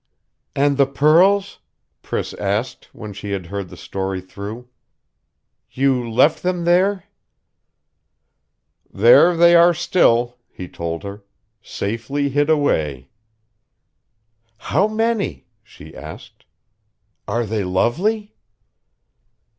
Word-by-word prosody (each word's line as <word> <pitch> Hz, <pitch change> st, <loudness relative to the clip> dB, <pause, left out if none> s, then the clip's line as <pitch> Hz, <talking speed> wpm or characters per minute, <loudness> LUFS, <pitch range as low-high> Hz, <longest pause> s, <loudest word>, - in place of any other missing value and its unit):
"And 140 Hz, 0 st, +1 dB
the 140 Hz, -1 st, +4 dB
pearls?" 175 Hz, +8 st, +3 dB, 0.4 s
Priss -, -, -4 dB
asked, 110 Hz, +6 st, -3 dB
when 105 Hz, -2 st, -9 dB
she 100 Hz, +1 st, -6 dB
had 95 Hz, -3 st, -4 dB
heard 100 Hz, +1 st, -6 dB
the 90 Hz, -, -12 dB
story 95 Hz, 0 st, -4 dB
through. 100 Hz, +6 st, -9 dB, 1.0 s
"You 130 Hz, -3 st, 0 dB
left 130 Hz, +7 st, +3 dB
them 180 Hz, -1 st, -2 dB
there?" 185 Hz, +3 st, +2 dB, 1.9 s
"There 120 Hz, -, +5 dB
they 170 Hz, +1 st, +6 dB
are 170 Hz, 0 st, +6 dB
still," 120 Hz, -8 st, +1 dB
he 90 Hz, -, -9 dB
told 85 Hz, -1 st, -6 dB
her. 100 Hz, +1 st, -8 dB, 0.4 s
"Safely 115 Hz, +7 st, -3 dB
hid 145 Hz, +2 st, 0 dB
away." 75 Hz, -, 0 dB, 1.5 s
"How 195 Hz, -, 0 dB
many?" 225 Hz, -1 st, -2 dB, 0.2 s
she -, -, -15 dB
asked. -, -, -12 dB, 0.8 s
"Are 120 Hz, 0 st, -1 dB
they 105 Hz, -1 st, -2 dB
lovely?" 185 Hz, -, -1 dB
125 Hz, 100 wpm, -20 LUFS, -, 1.9 s, they